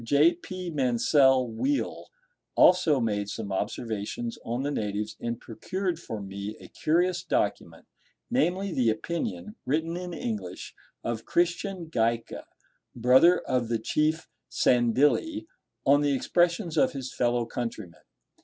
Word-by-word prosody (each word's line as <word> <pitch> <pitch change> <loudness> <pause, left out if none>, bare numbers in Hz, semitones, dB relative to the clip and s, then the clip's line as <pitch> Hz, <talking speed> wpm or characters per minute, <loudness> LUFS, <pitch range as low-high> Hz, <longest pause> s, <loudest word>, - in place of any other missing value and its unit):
J. 145 +8 +4
P. 180 +1 -7
Mansel 130 -1 +3
Weale 270 - -2 0.5
also 175 -6 +5
made 105 -3 -1
some 100 -1 -5
observations 110 +3 -3
on 120 +3 -2
the 145 - -1
natives, 105 -4 -3
and 115 0 -3
procured 180 - -3
for 110 -10 -6
me 100 +2 -6
a - - -13
curious 175 +3 +1
document, - - -2 0.5
namely, 195 -6 +1
the 120 -3 +2
opinion, 110 - -3
written 160 +5 -1
in 180 0 -5
English, 105 - -5 0.3
of 115 -1 -3
Christian 175 +1 0
Gaika, 115 -6 -1 0.5
brother 130 +9 +5
of 125 -2 -1
the 115 0 0
Chief 155 +8 0 0.2
Sandilli, 145 - +2 0.4
on 145 +1 +5
the 145 -1 +2
expressions 170 +3 +1
of - - +3
his 135 -2 -6
fellow 120 -1 +1
countrymen. 115 -8 -6
130 Hz, 125 wpm, -27 LUFS, 115-170 Hz, 0.5 s, also